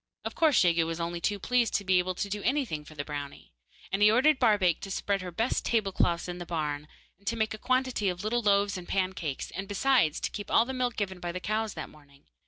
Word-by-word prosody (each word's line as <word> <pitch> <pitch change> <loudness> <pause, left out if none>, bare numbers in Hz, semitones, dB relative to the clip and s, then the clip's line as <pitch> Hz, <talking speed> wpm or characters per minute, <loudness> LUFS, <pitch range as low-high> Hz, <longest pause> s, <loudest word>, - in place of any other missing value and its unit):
Of - - -3
course, 315 -4 +4
Jegu 170 -2 +3
was 165 0 -4
only 170 0 -3
too 205 +4 0
pleased 240 +2 +1
to 200 - +1
be 185 -1 +3
able 185 0 -1
to 200 - -2
do 205 +1 -4
anything 245 - -1
for 155 +1 -14
the 145 -1 -4
brownie, 145 -1 -7 0.4
and 195 +2 -1
he 210 - +8
ordered 265 +6 +4
Barbaik 205 -8 +3
to 195 - -6
spread 200 0 -1
her 185 - -5
best 225 +8 -1
table 215 -4 +1
cloths 170 -2 +1
in 180 0 -5
the - - -4
barn, 150 -3 -3 0.3
and 200 - -23
to 230 - +1
make 220 -1 0
a 215 - -7
quantity 255 -5 +1
of 180 +1 -4
little 235 +3 0
loaves 200 -2 +2
and 175 - -11
pancakes, 185 -7 -2
and, 195 +2 -5
besides, 205 - +2
to - - -2
keep 205 -1 -6
all 230 - +4
the 265 - -4
milk 250 -2 -1
given 190 -3 -3
by 175 -1 -4
the 180 - -4
cows 215 +2 -2
that 160 - -5
morning. 145 -2 -20
195 Hz, 250 wpm, -29 LUFS, 170-220 Hz, 0.4 s, he